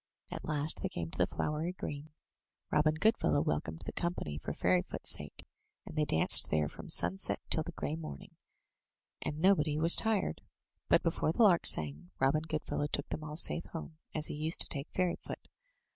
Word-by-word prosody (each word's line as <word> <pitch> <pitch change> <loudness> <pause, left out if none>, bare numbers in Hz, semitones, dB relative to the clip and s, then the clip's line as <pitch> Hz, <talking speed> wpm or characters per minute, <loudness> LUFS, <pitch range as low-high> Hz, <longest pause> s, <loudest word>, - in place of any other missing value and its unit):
At - - -6
last 150 0 +1
they - - -2
came 85 -1 -6
to - - -8
the - - +3
flowery 155 +4 -3
green. 150 -4 -7 0.6
Robin 155 +1 +2
Goodfellow 215 -3 +1
welcomed 80 - -3
the - - -5
company 170 - -4
for - - -6
Fairyfoot's 90 0 -1
sake, - - -2 0.4
and - - -10
they 155 -1 +1
danced 80 - +4
there 75 -1 0
from - - -11
sunset 95 +3 +3
till 160 - +7
the 170 +3 -6
grey 155 - -4
morning, 155 - -9 0.9
and 150 - -4
nobody 155 -4 +2
was 165 +2 +8
tired. 215 - 0 0.5
But - - +4
before 155 - 0
the 230 - +2
lark 180 -6 +4
sang, 75 +2 0
Robin 135 +3 +2
Goodfellow 155 -2 -3
took 140 0 -3
them 155 - -5
all 150 0 -7
safe 170 +1 +3
home, 160 -1 -9 0.2
as 155 -1 0
he - - -5
used 155 +3 +1
to - - +11
take 140 0 -2
Fairyfoot. 180 -2 -4
150 Hz, 180 wpm, -32 LUFS, 100-165 Hz, 0.9 s, to